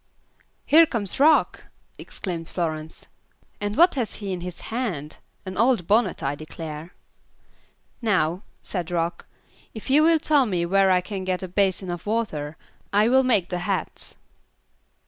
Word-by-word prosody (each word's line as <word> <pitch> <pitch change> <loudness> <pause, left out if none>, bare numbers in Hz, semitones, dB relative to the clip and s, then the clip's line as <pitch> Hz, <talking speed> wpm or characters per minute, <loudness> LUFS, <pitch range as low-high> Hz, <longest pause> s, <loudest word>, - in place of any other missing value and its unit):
"Here 325 +2 +7
comes 215 -6 -3
Rock," 305 +2 +4 0.3
exclaimed 170 -4 -6
Florence, 160 -2 -4 0.5
"and 205 +2 -3
what 350 +3 +6
has 245 -6 -2
he 200 -3 -4
in 180 - -5
his 180 0 -7
hand? 180 - -3 0.3
An 185 0 -6
old 235 -7 +3
bonnet, 210 -1 +2
I 135 +1 0
declare." 155 +2 -8 1.1
"Now," 185 -6 +1 0.2
said 180 -4 -3
Rock, 170 0 -2 0.5
"if 220 +4 -6
you 295 +3 +6
will 325 +1 +5
tell 295 -4 +3
me 175 -4 0
where 195 +2 +3
I 180 -1 +4
can 190 +1 -5
get 185 0 -2
a - - -3
basin 190 0 0
of 175 +3 -7
water, 160 -9 -2 0.3
I 210 +3 +4
will 265 +1 +5
make 220 -9 +2
the 180 - -2
hats." 175 - -4
190 Hz, 150 wpm, -24 LUFS, 170-230 Hz, 1.1 s, Here